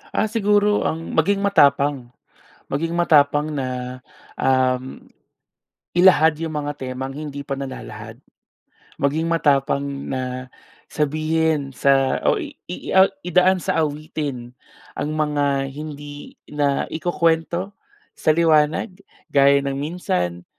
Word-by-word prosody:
Ah, - - +2
siguro 210 -1 +2
ang 165 +1 -4
maging 195 +5 +1
matapang, 140 -8 +3 0.6
maging 165 +4 -2
matapang 150 -2 +3
na, 125 -2 -4 0.3
um, 130 0 0 0.9
ilahad 165 -4 +5
'yong 160 +1 -5
mga 145 -1 -2
temang, 130 0 -6
hindi 145 -1 -7
pa 135 - -2
nalalahad. 115 -5 -8 0.8
Maging 155 +4 0
matapang 140 -4 +2 0.3
na, 130 -1 -4 0.4
sabihin 155 -1 0
sa, 135 -1 +2
o - - +2
i - - -6 0.2
i 90 - -5
o 190 +1 +6 0.2
idaan 180 +2 +4
sa 165 -2 0
awitin, 145 -5 -4 0.4
ang 145 - -2
mga 145 -2 0
hindi 145 -1 -9
naikukuwento, 165 +5 0 0.4
sa - - -1
liwanag, 160 +5 +2 0.3
gaya 140 0 +6
ng 140 - -1
minsan, 90 - -3
145 Hz, 110 wpm, -21 LUFS, 135-165 Hz, 0.9 s, o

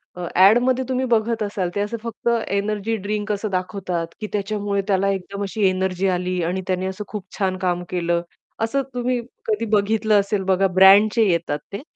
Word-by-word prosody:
अ, 180 -1 -5
ॲडमध्ये 245 +7 +5
तुम्ही 260 0 0
बघत 230 -1 +1
असाल 195 -3 -2
ते - - 0
असं 210 +3 -2
फक्त 230 0 -6 0.2
एनर्जी 205 +2 -1
ड्रिंक 210 +1 -2
असं 210 +1 -2
दाखवतात 185 -2 -2
की 215 - -3
त्याच्यामुळे 205 -1 -1
त्याला 195 0 +2
एकदम 200 +1 -4
अशी 200 +1 +1
एनर्जी 185 0 -1
आली 180 0 -1
आणि 180 +3 -1
त्याने 185 0 -1
असं 190 +2 -4
खूप 210 -4 -6
छान 190 -2 0
काम 180 -1 -1
केलं. 170 -1 0 0.4
असं 225 +5 0
तुम्ही 245 0 -1 0.3
कधी 220 +1 0
बघितलं 215 0 +3
असेल 200 0 -1
बघा 190 0 +2
ब्रँडचे 200 +5 +6
येतात 165 -4 0
ते, 200 - -4
200 Hz, 175 wpm, -22 LUFS, 185-215 Hz, 0.4 s, ब्रँडचे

